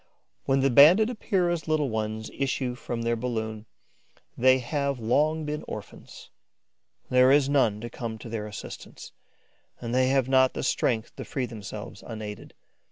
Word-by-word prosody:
When 135 0 +2
the 135 0 +3
Banded 175 - +7
Epeira's 175 -7 -1
little 155 -5 +1
ones 110 0 -3
issue 135 -2 -1
from 120 -1 -5
their 115 0 +1
balloon, 110 -2 -4 0.7
they 130 +1 +5
have 140 +1 -2
long 150 +7 +1
been 150 0 -4
orphans. - - -10 0.8
There 125 +1 +6
is 140 -1 +4
none 125 -7 +2
to 120 - -6
come 115 -3 -5
to 110 - -10
their 110 -2 -4
assistance; 105 - -9 0.7
and 120 0 -5
they 130 0 +3
have 135 -1 +2
not 130 -1 +4
the - - -3
strength 120 -3 0
to - - -5
free 130 -3 -3
themselves 110 -4 -8
unaided. 105 -2 -8
125 Hz, 155 wpm, -26 LUFS, 115-140 Hz, 0.8 s, Banded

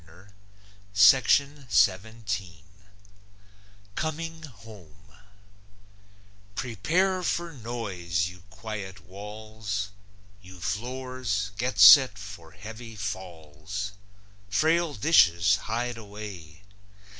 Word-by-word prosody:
COMING 165 +1 -4
HOME 100 - -14 1.4
Prepare 170 - 0
for 170 -1 -2
noise, 100 - -3
you 90 0 -11
quiet 105 -4 -7
walls! 105 +1 -6 0.5
You 90 -1 -13
floors, 120 +1 -3
get 120 0 -2
set 100 +3 +9
for 95 -5 -10
heavy 110 +3 -10
falls! 95 -1 -6 0.6
Frail 160 +8 +2
dishes, 95 - +4
hide 120 +1 -2
away! 100 -6 -10
105 Hz, 65 wpm, -27 LUFS, 95-125 Hz, 1.4 s, set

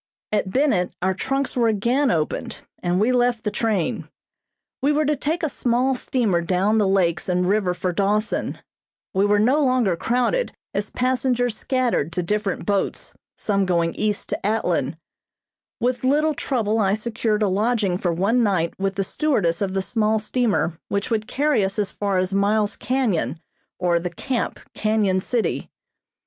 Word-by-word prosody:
At 205 -2 0
Bennett 210 -6 +1
our 190 +1 +2
trunks 270 +7 -2
were 240 -2 +3
again 235 +6 +2
opened, 155 -7 -1 0.3
and 175 +1 +1
we 220 +5 +3
left 245 -2 +1
the 210 - -1
train. 205 -6 -1 0.7
We 285 - +3
were 300 +1 +2
to 300 +1 +2
take 315 +5 -2
a - - +3
small 255 -1 +1
steamer 230 -8 0
down 190 +5 +1
the 205 - +3
lakes 185 -3 +1
and 180 0 +1
river 195 -2 +1
for 180 0 -2
Dawson. 205 +4 0 0.6
We 195 +2 +3
were 205 0 +3
no 260 +8 +3
longer 255 -8 +2
crowded, 250 - 0 0.2
as 205 +1 -2
passengers 250 -2 0
scattered 245 - 0
to 180 - -1
different 205 +1 -2
boats, 200 -2 -1 0.2
some 200 -2 0
going 170 -2 +1
east 210 -1 -2
to - - -3
Atlin. 220 +2 0 0.8
With 245 +1 0
little 300 +4 +3
trouble 225 -6 -1
I 200 -1 +3
secured 220 -1 -1
a - - +3
lodging 205 -1 +1
for 175 - 0
one 200 +9 +2
night 185 -7 +1
with 195 0 -1
the 195 - 0
stewardess 195 - 0
of 195 -1 -1
the 190 - +1
small 220 0 +1
steamer 210 -6 0
which 200 +3 -2
would 220 -1 0
carry 290 -6 +1
us 190 +2 -2
as 205 -2 -1
far 200 -2 -1
as 185 +1 0
Miles 205 +1 +2
Canyon 240 -11 -1 0.4
or 175 -2 +2
the 180 +1 -3
Camp, 250 +5 -3
Canyon 215 -3 +1
City. 230 +4 -1
210 Hz, 165 wpm, -22 LUFS, 190-245 Hz, 0.8 s, were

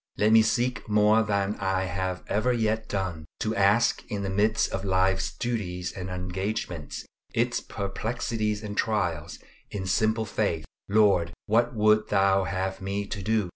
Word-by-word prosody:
Let 105 +1 +3
me 110 0 +8
seek 120 +2 0
more 105 +1 +5
than 100 -1 0
I 95 -1 0
have 95 0 -3
ever 110 +5 +1
yet 110 -2 0
done, 90 -6 -3 0.2
to 110 +1 0
ask 105 +3 +3
in 100 -1 -3
the 95 - -2
midst 105 +3 +2
of 95 - -3
life's 95 0 +1
duties 90 -7 -2
and 95 -1 -6
engagements, 90 -3 -4 0.3
its - - +1
perplexities 110 +1 -3
and 105 -1 -5
trials, 85 -8 -1 0.3
in 95 -2 -4
simple 110 +4 +1
faith, 95 -7 -1 0.2
"Lord! 100 -5 +3
what 120 +3 +2
wouldst 110 0 +3
thou 95 -1 +3
have 95 +1 -3
me 100 +1 -2
to 100 0 -5
do?" 105 -1 0
100 Hz, 155 wpm, -27 LUFS, 95-110 Hz, 0.3 s, me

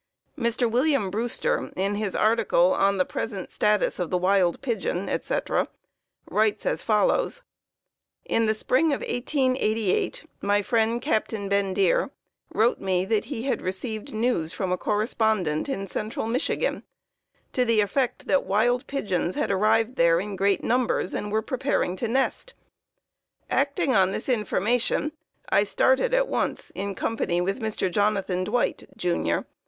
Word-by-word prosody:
Mr. 235 -2 +1
William 250 -3 +1
Brewster, 225 +4 -1
in 195 +2 0
his 205 -2 -2
article 215 -5 +3
"On 200 0 +2
the 185 - +2
Present 200 -5 -5
Status 210 -1 +1
of 175 -3 -2
the 180 - +1
Wild 185 -1 +2
Pigeon," 200 -7 -2
etc., - - -1 0.6
writes 215 0 +1
as - - 0
follows: - - +1 0.8
"In 230 -1 +1
the 215 - +2
spring 255 +8 +2
of - - -2
1888 245 -6 0 0.2
my 205 0 +2
friend, 230 +1 +1
Captain 220 -7 -1
Bendire, 195 -2 +2 0.4
wrote 230 +3 +2
me 185 -1 0
that 215 +1 0
he 250 -5 -5
had 270 - -1
received 210 +4 -4
news 215 -8 0
from 190 -2 -2
a 180 - +1
correspondent 210 - 0
in 195 -8 -2
central 215 +3 -4
Michigan 255 - -1 0.7
to 250 - +2
the 230 -3 +2
effect 240 +5 0
that 280 - +2
wild 240 +5 +1
pigeons 185 -10 -1
had - - 0
arrived 220 +5 +2
there 170 0 +4
in 200 +2 -4
great 195 +1 +1
numbers 245 -6 +1
and 210 - -3
were 220 +1 +1
preparing 255 -8 -1
to 235 - -2
nest. 270 - -1 1.0
Acting 280 -1 +1
on 190 -3 +4
this 195 - -4
information, 240 +4 0 0.4
I - - +4
started - - +2
at - - +2
once, - - -2
in 200 0 -4
company 180 -6 -1
with 195 +6 -1
Mr. 215 -5 -2
Jonathan 195 -2 +1
Dwight, 240 +6 -1
Jr. 170 - 0
215 Hz, 145 wpm, -25 LUFS, 195-245 Hz, 1.0 s, there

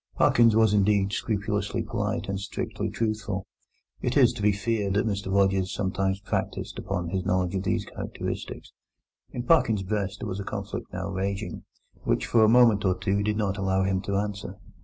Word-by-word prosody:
Parkins 115 -2 +5
was, 110 -2 +4
indeed, 100 -1 +3
scrupulously 105 +1 -1
polite 105 0 -2
and 100 -1 -2
strictly 100 - -4
truthful. 110 -4 -2 0.6
It - - 0
is - - +6
to - - -7
be 105 +1 +4
feared 100 -1 -1
that 100 - +2
Mr 100 -3 -2
Rogers 95 -1 +2
sometimes 95 -1 -1
practised - - -3
upon 90 -3 -3
his 95 +1 -1
knowledge 90 -2 0
of 95 - -1
these 95 - -1
characteristics. - - -6 0.6
In 120 - -5
Parkins's 115 -10 +3
breast 100 0 -2
there 115 - -4
was 95 0 -4
a - - -3
conflict - - -5
now 95 +1 -4
raging, 100 +2 -3 0.4
which - - +1
for 115 -2 +4
a 110 - +6
moment 115 -3 +5
or 95 -2 +2
two 100 +1 0
did 105 0 0
not 100 -2 -1
allow 95 0 +1
him 95 -1 0
to 100 0 -2
answer. 100 0 -3
100 Hz, 180 wpm, -26 LUFS, 95-105 Hz, 0.6 s, is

